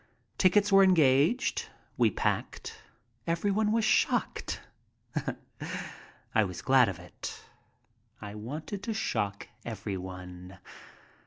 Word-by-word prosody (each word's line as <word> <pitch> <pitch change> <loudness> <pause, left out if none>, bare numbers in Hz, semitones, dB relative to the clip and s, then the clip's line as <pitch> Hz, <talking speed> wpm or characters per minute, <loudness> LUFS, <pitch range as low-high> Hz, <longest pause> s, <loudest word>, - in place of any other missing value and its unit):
Tickets 200 +2 +4
were 195 0 +8
engaged. 165 - +3 0.3
We - - +4
packed. - - -2 0.5
Everyone 200 +5 +1
was 225 0 +2
shocked. 220 - +1 1.7
I 110 - +5
was 90 -3 -5
glad 130 -4 +5
of 95 - -5
it. - - -8 0.8
I 105 -1 -7
wanted 150 - -5
to 225 0 -3
shock 100 - -1 0.2
everyone. 90 -1 -6
135 Hz, 95 wpm, -30 LUFS, -, 1.7 s, were